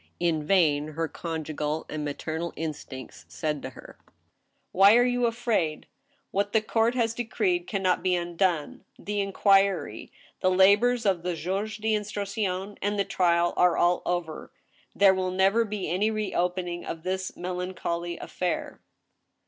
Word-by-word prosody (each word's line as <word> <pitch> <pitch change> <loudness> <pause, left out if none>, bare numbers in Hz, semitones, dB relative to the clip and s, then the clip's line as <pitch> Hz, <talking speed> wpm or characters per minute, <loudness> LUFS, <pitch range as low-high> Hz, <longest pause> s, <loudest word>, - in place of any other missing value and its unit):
In 165 -3 +1
vain 150 -4 +3
her 165 +1 -1
conjugal 155 -2 -4
and 155 -1 -4
maternal 160 +3 -4
instincts 150 -4 -7
said 150 -3 -3
to - - -5
her: - - -14 0.4
" - - -49 0.3
Why 200 +4 +7
are 245 - +5
you 245 -1 +2
afraid? 230 -9 -1 0.5
What 200 +1 -1
the 220 - +4
court 225 +2 +1
has 230 -2 +1
decreed 350 - -1
can 195 -2 -2
not 185 -1 +2
be 185 -1 +2
undone. 175 -2 -1
The 205 0 -2
inquiry, 195 - +2 0.3
the 185 - +2
labors 205 +6 +4
of 190 -4 +2
\htjuge 185 +5 -3
d' 220 0 +1
instruction, 200 -1 -3
and 205 +1 -1
the 200 - +1
trial 175 -1 +2
are 180 -1 +3
all 175 0 +3
over. 175 -3 -3 0.4
There 200 -1 +6
will 185 -1 -1
never 195 +5 +3
be 210 -3 -4
any 185 +7 +1
reopening 180 -4 -2
of 165 -1 -6
this 190 0 -2
melan 180 +1 -4
choly 170 0 -3
affair." 180 -2 -3
185 Hz, 150 wpm, -27 LUFS, 170-205 Hz, 0.5 s, Why